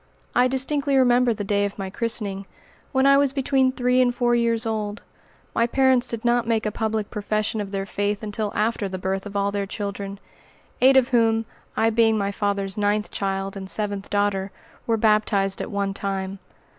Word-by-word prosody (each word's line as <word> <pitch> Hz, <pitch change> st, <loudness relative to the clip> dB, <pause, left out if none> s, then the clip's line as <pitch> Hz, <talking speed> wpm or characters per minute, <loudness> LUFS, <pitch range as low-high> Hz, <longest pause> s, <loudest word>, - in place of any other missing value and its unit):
I 250 Hz, +1 st, +4 dB
distinctly 275 Hz, +2 st, 0 dB
remember 250 Hz, -1 st, +4 dB
the 215 Hz, -2 st, -3 dB
day 205 Hz, 0 st, +1 dB
of 200 Hz, 0 st, -3 dB
my 190 Hz, -2 st, -5 dB
christening, 205 Hz, -3 st, -2 dB, 0.4 s
when 265 Hz, -1 st, +2 dB
I 275 Hz, 0 st, +6 dB
was 280 Hz, -1 st, +2 dB
between 265 Hz, -1 st, +2 dB
three 250 Hz, 0 st, +2 dB
and 245 Hz, -1 st, +2 dB
four 240 Hz, -1 st, +2 dB
years 235 Hz, -1 st, +1 dB
old. 215 Hz, -1 st, -3 dB, 0.5 s
My 230 Hz, 0 st, +2 dB
parents 260 Hz, 0 st, +3 dB
did 230 Hz, 0 st, -5 dB
not 240 Hz, -1 st, +2 dB
make 225 Hz, -2 st, +1 dB
a 215 Hz, -, 0 dB
public 220 Hz, -1 st, -2 dB
profession 215 Hz, 0 st, -1 dB
of 200 Hz, -, -5 dB
their 195 Hz, -1 st, -3 dB
faith 205 Hz, +2 st, -2 dB
until 210 Hz, 0 st, -3 dB
after 215 Hz, -2 st, 0 dB
the 185 Hz, -, -4 dB
birth 190 Hz, +2 st, -3 dB
of 205 Hz, -, -10 dB
all 200 Hz, 0 st, +1 dB
their 200 Hz, -1 st, -2 dB
children, 200 Hz, -1 st, -5 dB, 0.6 s
eight 265 Hz, +1 st, +6 dB
of 260 Hz, -1 st, +4 dB
whom 225 Hz, -2 st, +2 dB, 0.3 s
I 225 Hz, 0 st, +3 dB
being 225 Hz, -1 st, +3 dB
my 200 Hz, -1 st, -1 dB
father's 200 Hz, -1 st, -2 dB
ninth 210 Hz, 0 st, 0 dB
child 195 Hz, 0 st, -3 dB
and 190 Hz, -1 st, -6 dB
seventh 205 Hz, -2 st, -3 dB
daughter 205 Hz, -1 st, 0 dB, 0.4 s
were 225 Hz, -1 st, +2 dB
baptized 210 Hz, -3 st, +2 dB
at -, -, -5 dB
one 200 Hz, -2 st, -1 dB
time. 195 Hz, -1 st, -4 dB
215 Hz, 190 wpm, -23 LUFS, 200-240 Hz, 0.6 s, I